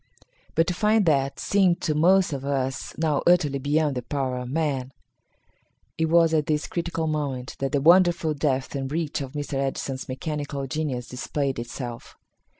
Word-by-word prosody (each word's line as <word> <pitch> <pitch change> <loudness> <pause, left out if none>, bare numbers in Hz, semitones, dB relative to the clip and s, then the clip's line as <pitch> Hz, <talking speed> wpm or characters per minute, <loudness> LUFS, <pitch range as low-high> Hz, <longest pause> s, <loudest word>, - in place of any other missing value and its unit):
But 165 - +4
to 180 - -1
find 210 +2 +2
that 140 -4 +1
seemed 190 -4 +2
to 155 - 0
most 180 +2 +4
of 135 -1 -4
us 135 -2 -2
now 155 -3 +1
utterly 150 -6 +3
beyond 145 +2 +1
the 125 - -2
power 130 0 -2
of 125 0 -6
man. 135 -3 -1 1.0
It 160 - +1
was 165 -1 +4
at 155 -2 +2
this 150 -1 0
critical 170 -1 -3
moment 145 -4 -3
that 135 -1 -1
the 140 - +1
wonderful 170 0 +5
depth 135 -3 -1
and 135 -1 -3
reach 155 -2 -2
of 135 -1 -6
Mr. 145 -2 -3
Edison's 135 -1 -3
mechanical 145 +1 -4
genius 135 -3 -3
displayed 135 +1 -2
itself. 120 0 -7
145 Hz, 165 wpm, -25 LUFS, 135-160 Hz, 1.0 s, wonderful